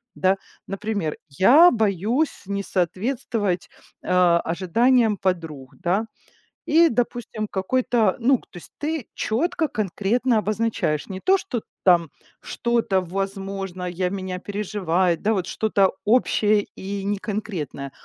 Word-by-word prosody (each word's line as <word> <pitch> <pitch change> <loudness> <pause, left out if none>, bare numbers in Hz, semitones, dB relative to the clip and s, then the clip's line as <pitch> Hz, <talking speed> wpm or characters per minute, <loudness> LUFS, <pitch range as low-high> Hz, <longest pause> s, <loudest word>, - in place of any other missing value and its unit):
Да? 190 +1 +2 0.3
Например: 195 -5 -3
я 250 - +6
боюсь 220 - 0
не 200 +1 -3
соответствовать, 200 +1 -1 0.3
э, - - -13
ожиданиям 185 +6 +3
подруг. 165 -8 -3
Да? 195 +6 0 0.6
И, 330 +2 +5
допустим, 235 -4 -2
какой-то, 220 +1 +1
ну 255 +2 +4
к - - -22
то 180 - -11
есть - - -14
ты 305 -4 -3
четко, 315 +8 0
конкретно 220 - 0
обозначаешь 215 -8 -1
не 190 -1 -5
то, 380 - +4
что 365 - -4 0.2
там 170 -4 +4 0.3
что-то, 235 -5 0
возможно, 195 0 -4
я 180 +1 -1
меня 185 -1 -4
переживает, 185 -4 -1
да, 215 - +2
вот 190 -5 -1
что-то 200 -3 +2
общее 215 -2 +3
и 200 +1 -5
неконкретное, 200 -8 -4
200 Hz, 120 wpm, -23 LUFS, 185-230 Hz, 0.6 s, я